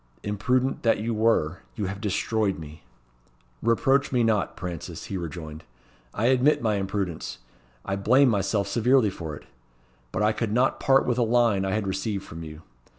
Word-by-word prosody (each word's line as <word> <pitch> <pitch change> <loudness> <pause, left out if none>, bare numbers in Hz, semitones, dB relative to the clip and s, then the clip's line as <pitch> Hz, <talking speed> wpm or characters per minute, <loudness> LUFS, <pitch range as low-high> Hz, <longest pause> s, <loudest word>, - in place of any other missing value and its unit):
Imprudent 125 +6 0
that 115 - +3
you 115 +2 -2
were, 105 -7 +1 0.2
you 105 - -2
have 100 +2 -5
destroyed 105 -1 0
me!" 75 -1 -10 0.8
"Reproach 135 +5 +2
me 125 -2 +2
not, 110 -3 0
Prances," 85 -1 -6
he 100 - -6
rejoined. 80 -3 -6 0.5
"I 110 - -2
admit 130 +4 +4
my 110 -3 0
imprudence, 95 -10 -3 0.5
and 100 0 -3
blame 130 +5 +5
myself 100 -1 0
severely 120 +1 +3
for 80 -5 -6
it. - - -13 0.7
But - - -1
I 105 - +4
could 110 -1 -2
not 125 +3 +2
part 135 0 +4
with 125 0 0
a - - +3
line 115 -4 +3
I 95 - -1
had 110 -1 -1
received 95 +1 -2
from 80 +1 -9
you. 75 0 -10
105 Hz, 170 wpm, -26 LUFS, 95-115 Hz, 0.8 s, blame